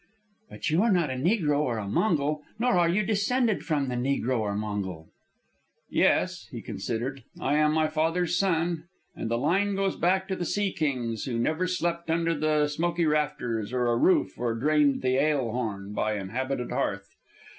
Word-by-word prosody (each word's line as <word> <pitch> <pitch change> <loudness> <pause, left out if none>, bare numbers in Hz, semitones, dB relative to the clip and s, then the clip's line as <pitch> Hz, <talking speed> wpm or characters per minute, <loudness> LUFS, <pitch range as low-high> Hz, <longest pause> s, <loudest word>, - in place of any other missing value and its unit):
"But - - -3
you 160 +4 +3
are 230 0 +3
not 170 -7 +2
a - - -2
negro 150 - +1
or 125 -6 0
a 105 -2 -4
Mongol, 150 - +1 0.2
nor 245 +2 +2
are 175 -1 +3
you 200 +5 +2
descended 220 +2 +1
from 145 -4 0
the 125 - -2
negro 125 0 0
or 105 -2 -1
Mongol." 100 -6 -4 0.8
"Yes," - - +2
he - - -7
considered, 125 +3 -4 0.2
"I 145 +2 +1
am 150 0 +4
my 155 0 +2
father's 165 +3 0
son, 170 -3 0 0.3
and 115 - -4
the 115 - +1
line 195 +10 +1
goes 195 -1 0
back 190 +2 +1
to 190 - 0
the 180 - -3
sea 200 +3 0
kings 125 -8 -2
who 120 -3 -2
never 155 +9 0
slept 170 -2 -2
under 165 0 +1
the 150 0 +2
smoky 170 +3 0
rafters 145 -8 -1
of 125 - 0
a 120 -1 +2
roof 185 +10 +2
or 120 -1 0
drained 145 +2 +2
the 130 0 +2
ale 140 -5 +1
horn 105 -4 -4
by 110 0 0
inhabited 125 +6 -3
hearth. 100 -1 -2
150 Hz, 180 wpm, -27 LUFS, 120-175 Hz, 0.8 s, am